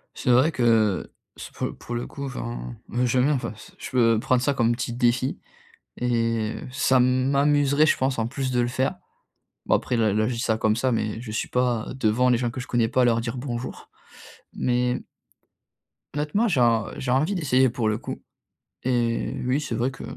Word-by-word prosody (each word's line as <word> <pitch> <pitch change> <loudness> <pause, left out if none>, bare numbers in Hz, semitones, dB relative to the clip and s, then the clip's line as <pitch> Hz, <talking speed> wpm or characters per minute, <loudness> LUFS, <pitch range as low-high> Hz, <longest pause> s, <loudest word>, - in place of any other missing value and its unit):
C'est - - -3
vrai 130 +6 +5
que, 115 - +2 0.3
c - - -8
pour - - -4
pour 120 - -6
le 120 - -3
coup, 140 - -7
enfin, - - -5
b 125 +1 0
je 125 +1 +1
veux 125 - +4
bien, 150 - +3
enfin, 125 -5 -3
s 110 - -15
je - - -7
peux 115 -3 +3
prendre 125 +1 +1
ça 140 - +2
comme 120 -3 +2
petit 125 0 -3
défi 125 +1 +1 0.6
et, 115 -2 0
heu, - - -8
ça 130 0 +3
m'amuserait, 140 +3 +3
je - - +3
pense, 130 -1 0
en 110 - 0
plus 135 +1 -3
de 125 -1 +2
le 120 - +1
faire. 130 +2 -1 0.7
Bon, - - +3
après, 125 - -1
là 110 -3 +2
là 110 +1 +1
je 125 - -1
dis - - -5
ça 110 -2 +1
comme 110 -1 +2
ça, 130 +3 0
mais 110 -2 -1
je 115 -3 -7
suis 110 - -3
pas 125 -3 0
devant 120 +2 +2
les 125 - +4
gens 120 0 -1
que 125 - -5
je - - -9
connais 120 -2 +1
pas 125 +3 +1
à - - +5
leur 115 -1 +3
dire 115 +2 -4
«bonjour», 125 -1 -6 0.6
mais 125 0 0 1.1
honnêtement, 150 +10 +1
j'ai 160 - +2
en 115 -2 +3
j'ai 125 - -2
envie 150 +9 +2
d'essayer 130 -6 +3
pour 115 -2 -1
le 105 - 0
coup, - - -7 0.6
et 120 -2 0
oui, 130 +3 +1
c'est 150 - -4
vrai 120 +3 0
que - - -11
125 Hz, 215 wpm, -24 LUFS, 115-130 Hz, 1.1 s, vrai